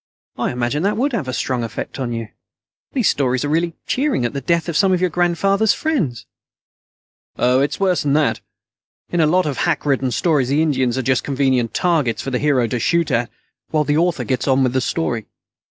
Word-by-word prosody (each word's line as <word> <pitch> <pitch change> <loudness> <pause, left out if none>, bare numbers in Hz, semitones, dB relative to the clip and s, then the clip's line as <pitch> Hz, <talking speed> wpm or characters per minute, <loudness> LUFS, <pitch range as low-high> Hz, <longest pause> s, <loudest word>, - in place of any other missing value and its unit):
"I - - -1
imagine 125 +4 -1
that 205 +3 0
would 270 +3 0
have 190 - -2
a - - -2
strong 125 -1 -2
effect 115 - -6
on 125 -2 -2
you. 115 -2 -4 0.6
These 250 -7 +1
stories 130 -1 +1
are - - -2
really 165 +2 0
cheering 265 - 0
at 120 - -2
the 140 - -3
death 170 +5 0
of 170 - -3
some 195 +3 +3
of 180 - +1
your 180 -1 +1
grandfather's 195 +5 +2
friends." 190 - -2 1.1
"Oh, 125 +1 +3
it's 140 +2 -1
worse 185 -3 +2
than 140 -1 0
that. 150 -1 +1 0.7
In 175 - 0
a 155 - +4
lot 180 +4 +2
of 145 -3 -2
hack 165 -4 0
written 135 -2 +1
stories, 145 -2 +1
the 145 +3 +2
Indians 130 -5 0
are 130 - -1
just 130 +1 +1
convenient 130 -4 0
targets 155 -10 +1
for 135 - -4
the 125 - 0
hero 140 -5 +2
to 120 +1 -2
shoot 170 +6 +1
at 120 0 0 0.4
while 155 -1 +1
the 145 0 +1
author 175 +2 +1
gets 130 0 -2
on 135 0 +3
with 125 -1 +1
the 130 - +1
story. 120 -4 -2
145 Hz, 215 wpm, -19 LUFS, 130-175 Hz, 1.1 s, a